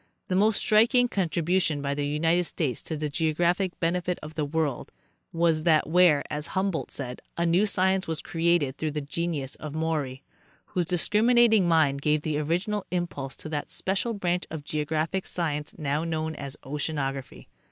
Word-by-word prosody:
The 185 - +1
most 210 +2 +3
striking 240 +4 +4
contribution 175 -5 0
by 140 0 -1
the 145 0 -1
United 165 +4 +2
States 145 -7 -2
to 160 - -4
the 150 0 -2
geo 155 +1 0
graphic 175 +2 +1
benefit 175 +1 0
of 155 +1 -8
the 155 -2 -1
world 145 -3 -2 0.4
was 165 -2 +2
that 155 -1 +3
where, 165 -3 +5
as 150 0 -4
Humboldt 190 -3 0
said, 125 -3 -5 0.2
a 170 - +1
new 175 +5 +3
science 190 -1 +1
was 160 -1 -2
created 165 -6 +1
through 155 - -1
the 150 - -2
genius 145 -2 -3
of 150 -1 -7
Maury, 150 -5 -2 0.4
whose 175 -2 -2
discriminating 220 +3 +4
mind 155 -5 +3
gave 150 +1 +1
the 150 -2 -1
original 180 +7 -1
impulse 170 -7 -3
to 155 - -7
that 150 -2 -3
special 200 +5 -1
branch 180 -2 -1
of 160 -2 -6
geographic 155 +5 -2
science 150 -4 -3
now 150 0 -1
known 160 -1 -2
as 140 -3 -7
oceanography. 135 - -4
160 Hz, 170 wpm, -27 LUFS, 150-180 Hz, 0.4 s, where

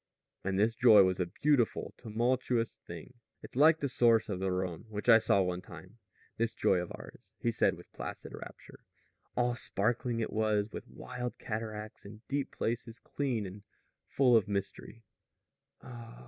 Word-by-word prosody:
And 95 0 -1
this 110 +3 +3
joy 110 -4 +8
was 95 0 +1
a 90 - 0
beautiful, 140 +3 +1
tumultuous 120 +1 -1
thing. 85 +9 -9 0.3
"It's - - -11
like 155 +4 +6
the 140 - +1
source 120 -4 +3
of 95 -3 -2
the 95 0 0
Rhone, 90 0 -3
which 105 +1 -5
I 115 -2 +9
saw 100 -3 +3
one 90 0 -2
time 90 +6 -13 0.4
this 115 0 -1
joy 95 - +3
of 90 - -5
ours," 100 +4 -13
he 120 - 0
said - - +2
with - - -15
placid - - -7
rapture. - - -11 0.6
"All 120 0 +2
sparkling 120 +2 -1
it 115 - -2
was, 110 -1 +1
and - - -4
wild 125 -1 -6
cataracts, 110 -1 -5
and 105 +3 -13
deep 140 -1 -1
places, 115 0 -3
clean 125 -7 -2
and 95 +2 -8 0.5
full 125 -3 +4
of 110 - +4
mystery." 100 +3 -4
110 Hz, 160 wpm, -32 LUFS, 100-120 Hz, 0.6 s, I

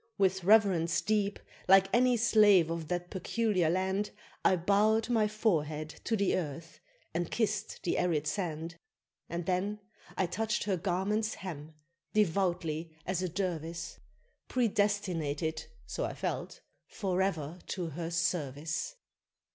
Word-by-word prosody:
With 190 -1 +2
reverence 190 -5 +4
deep, 205 -1 0 0.3
like 195 0 +7
any 250 0 +4
slave 210 -7 +5
of 165 -2 -3
that 175 +1 -3
peculiar 195 -3 +1
land, 190 +3 0 0.3
I 190 - +5
bowed 210 +6 +2
my 220 -3 +3
forehead 155 -8 0 0.2
to 225 - +1
the 200 -2 +2
earth, 165 -1 -5 0.3
and 170 0 -1
kissed 215 -2 -1
the 175 - 0
arid 160 -4 +1
sand; 165 -1 -3 0.5
And 170 0 -3
then 195 +4 -1 0.4
I 190 - +2
touched 215 +5 -1
her 200 -2 +1
garment's 200 +5 0
hem, 160 -4 -8 0.4
devoutly 170 -5 0
as 185 -1 -1
a 185 - -1
Dervise, 170 -2 -3 0.5
Predestinated 195 - 0 0.2
(so - - -3
I - - -4
felt) - - -4 0.3
forever 180 -5 -1
to 175 -4 -3
her 165 +2 -4
service. 165 - -1
185 Hz, 125 wpm, -31 LUFS, 165-205 Hz, 0.5 s, like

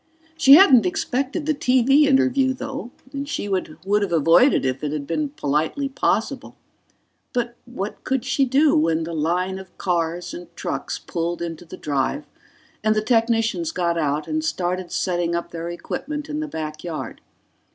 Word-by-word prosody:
She 275 -4 +7
hadn't 265 - +7
expected 270 - -2
the 310 - +2
TV 270 +2 +4
interview, 265 -1 +3
though, 270 -1 -6 0.2
and 280 +1 -4
she 205 - -3
would 190 -2 -1 0.3
have 200 -3 -1
avoided 165 - +4
it - - +3
if 130 +3 -5
it 150 - -1
had 150 -2 -3
been 290 - -1
politely 160 - -1
possible. 275 - -1 0.8
But 240 -1 -1
what 215 -5 -6
could 265 -1 -1
she 265 +1 +2
do 280 +4 +3
when 160 +1 +2
the 165 +1 -5
line 180 +4 -1
of 190 -1 -14
cars 175 -1 -1
and 175 0 -8
trucks - - -4
pulled 170 0 -3
into 170 0 -5
the - - -10
drive 145 - -1 0.6
and 215 0 +3
the 215 - +1
technicians 230 +7 +1
got 170 - 0
out 150 -2 -1
and 310 0 -1
started 185 - -2
setting 175 -2 0
up 170 0 -4
their 170 0 -5
equipment 295 - -5
in 300 0 -3
the 310 - -3
backyard? 155 - -6
195 Hz, 165 wpm, -22 LUFS, 170-270 Hz, 0.8 s, She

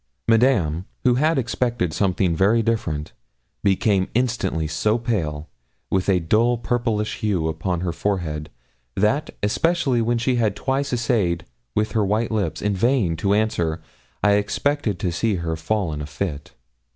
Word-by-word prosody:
Madame, 110 - +3 0.2
who 125 -2 +4
had 155 +5 +2
expected 120 -7 -1
something 95 -3 +1
very 105 +6 +3
different, 85 -10 -2 0.5
became 100 -1 +2
instantly 115 -10 0
so 95 +9 +1
pale, 80 -11 -2 0.4
with 95 +1 +1
a 95 -2 +4
dull 115 +8 +2
purplish 115 -3 -1
hue 95 -7 0
upon 85 +2 -2
her 90 -2 -1
forehead, 80 -5 -2 0.5
that, 135 +10 +1
especially 135 +2 +2
when 120 +1 +1
she 125 +2 +1
had 110 -4 +1
twice 135 +1 -1
essayed 110 -8 0 0.3
with 105 +1 +1
her 110 - +1
white 110 +4 0
lips, 100 -7 -1
in 105 -1 +1
vain, 110 -5 +2
to 100 +4 +1
answer, 95 -7 0 0.4
I 105 -1 +5
expected 145 +1 -1
to 95 -5 -1
see 105 +5 0
her 85 -2 -2
fall 85 +1 -1
in 75 - -4
a 75 - -5
fit. 75 -3 -5
105 Hz, 150 wpm, -22 LUFS, 85-115 Hz, 0.5 s, I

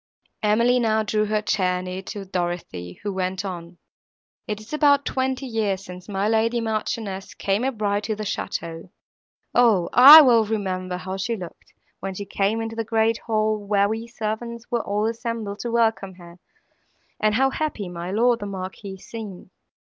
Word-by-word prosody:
Emily 235 +4 +3
now 220 -2 +2
drew 215 0 0
her 215 0 -1
chair 180 -3 0
near 185 +1 -5
to 195 +1 -7
Dorothée, 175 - -4
who 205 -1 -2
went 185 +1 -2
on. 175 -2 -7 0.7
"It 210 0 -3
is 215 +6 -12
about 285 -2 +4
twenty 260 0 -1
years 210 -5 -2
since 180 +2 -10
my 195 0 -1
lady 225 +2 +2
Marchioness 215 -3 -3
came 200 +4 0
a 265 - +1
bride 205 -3 -1
to 215 - -1
the 215 - -5
château. 170 -4 -4 0.6
O! 225 -8 +4
I 285 +6 +12
well 240 -5 +5
remember 185 -4 -3
how 190 +1 -5
she 225 +5 -2
looked, 180 -5 -11 0.3
when 195 -1 -5
she 200 - -5
came 200 +3 0
into 225 0 -5
the 225 - -2
great 225 0 +1
hall, 215 -1 +1
where 200 0 +2
we 225 +2 -4
servants 235 +1 -5
were 235 -1 +1
all 210 +1 -1
assembled 225 -3 -3
to 240 - -4
welcome 225 -5 +1
her, 175 -1 -14 0.8
and 215 0 +2
how 270 +2 +3
happy 290 -11 -3
my 175 0 -6
lord 235 +4 +2
the 205 - -5
Marquis 190 0 -7
seemed. 195 -3 -9
210 Hz, 170 wpm, -23 LUFS, 190-230 Hz, 0.8 s, I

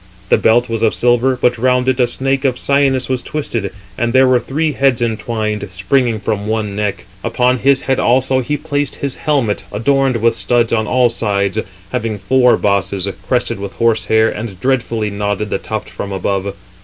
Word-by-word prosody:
The - - +5
belt 120 +2 +3
was 115 -2 -3
of 110 -2 +2
silver, 125 +2 +2
but 120 -1 +1
round 125 +1 +2
it 130 0 +1
a 125 - +4
snake 135 +2 -1
of 130 -3 +1
cyanus 140 -2 +1
was 130 -1 -1
twisted, 115 -9 -3 0.3
and 120 0 0
there 130 0 +5
were 130 -1 +4
three 150 +6 -1
heads 135 -4 +2
entwined, 110 -2 -2
springing 110 +5 0
from 105 0 -2
one 110 -2 -2
neck. 100 -3 -2 0.2
Upon 125 0 +1
his 135 +1 +3
head 135 -1 0
also 130 +1 +2
he 140 +4 -1
placed 145 -3 -2
his 140 -2 -4
helmet, 135 -9 0
adorned 135 0 +1
with 115 +1 +2
studs 120 0 +1
on 110 -1 +1
all 125 0 +3
sides, 100 -2 -1 0.3
having 115 -4 -2
four 125 +3 +3
bosses, 100 -1 0 0.2
crested 120 -3 0
with 100 0 -6
horse 115 -1 +1
hair, 110 0 +3
and 105 -4 -5
dreadfully 115 -4 0
nodded 105 0 -2
the - - 0
tuft - - -5
from 100 - -6
above. 100 +1 -2
120 Hz, 185 wpm, -16 LUFS, 105-130 Hz, 0.3 s, The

